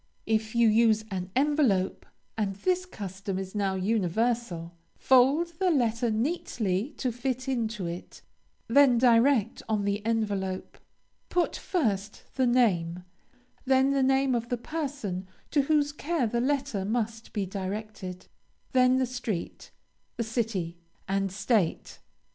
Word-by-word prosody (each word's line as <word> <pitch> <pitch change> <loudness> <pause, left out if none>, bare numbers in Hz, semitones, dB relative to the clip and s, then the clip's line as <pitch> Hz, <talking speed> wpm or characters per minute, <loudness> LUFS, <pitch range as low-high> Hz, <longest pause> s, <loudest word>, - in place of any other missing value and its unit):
If 220 0 0
you 235 -1 +5
use 220 0 +4
an 185 -1 -3
envelope, 265 -9 +1 0.3
and 205 -3 -1
this 365 - 0
custom 195 - -5
is 190 0 -5
now 200 -2 0
universal, 195 -2 -1 0.2
fold 275 +7 +4
your 375 - +4
letter 240 -6 +1
neatly 225 - -1
to 255 - -1
fit 255 +2 -3
into 225 -6 -1
it; 170 +1 -7 0.4
then 255 0 +5
direct 235 -1 +4
on 210 -2 0
the 205 +1 -1
envelope. 205 -4 -2 0.5
Put 355 -1 +1
first 215 - -2
the 260 -2 +2
name, 180 -8 +2 0.6
then 265 +1 +4
the 275 -1 +2
name 265 0 +3
of 235 -1 -2
the 245 - 0
person 240 - -4 0.2
to 295 - +4
whose 290 0 +2
care 295 -1 -1
the 235 +2 0
letter 270 -6 0
must 225 +1 -2
be 205 -3 -1
directed, 190 -1 -5 0.5
then 255 0 +4
the 260 - +2
street, 235 -7 -5 0.5
the 230 - 0
city, 215 -7 -2 0.3
and 195 0 0
State. 205 -2 0
225 Hz, 130 wpm, -28 LUFS, 195-260 Hz, 0.6 s, you